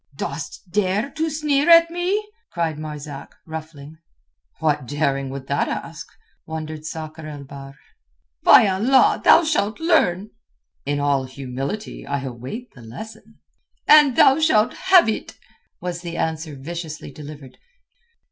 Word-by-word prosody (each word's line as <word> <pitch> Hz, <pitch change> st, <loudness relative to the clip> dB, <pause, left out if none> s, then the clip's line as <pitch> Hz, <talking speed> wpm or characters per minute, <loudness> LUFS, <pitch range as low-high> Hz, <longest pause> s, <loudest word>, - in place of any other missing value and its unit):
"Dost 140 Hz, +6 st, -6 dB
dare 205 Hz, +6 st, 0 dB
to 320 Hz, +2 st, -2 dB
sneer 300 Hz, 0 st, +1 dB
at 335 Hz, 0 st, +7 dB
me?" 370 Hz, +5 st, -1 dB, 0.2 s
cried 165 Hz, -3 st, -2 dB
Marzak, 150 Hz, -2 st, -8 dB
ruffling. 155 Hz, -1 st, -9 dB, 0.6 s
"What 150 Hz, -4 st, 0 dB
daring 140 Hz, -1 st, -1 dB
would 135 Hz, 0 st, -7 dB
that 140 Hz, +1 st, 0 dB
ask?" -, -, -6 dB, 0.4 s
wondered 155 Hz, -1 st, -6 dB
Sakr 155 Hz, 0 st, -7 dB
el 145 Hz, -2 st, -8 dB
Bahr. 135 Hz, 0 st, -11 dB, 0.7 s
"By 220 Hz, -, +7 dB
Allah, 225 Hz, +8 st, +3 dB
thou -, -, +7 dB
shalt 300 Hz, -9 st, 0 dB
learn." 210 Hz, -, +2 dB, 0.6 s
"In 145 Hz, 0 st, 0 dB
all 140 Hz, -2 st, +1 dB
humility 135 Hz, +9 st, -6 dB
I 140 Hz, -1 st, -2 dB
await 130 Hz, -, -7 dB
the 125 Hz, -, -15 dB
lesson." 125 Hz, -, -11 dB, 0.5 s
"And 295 Hz, -4 st, +7 dB
thou 270 Hz, +5 st, +6 dB
shalt 275 Hz, -9 st, +3 dB, 0.2 s
have 365 Hz, -6 st, +7 dB
it," 220 Hz, -, -3 dB, 0.4 s
was 175 Hz, -1 st, -5 dB
the 170 Hz, -1 st, -6 dB
answer 160 Hz, -2 st, -3 dB
viciously 160 Hz, +3 st, -7 dB
delivered. 145 Hz, -3 st, -11 dB
160 Hz, 130 wpm, -22 LUFS, 140-220 Hz, 0.7 s, at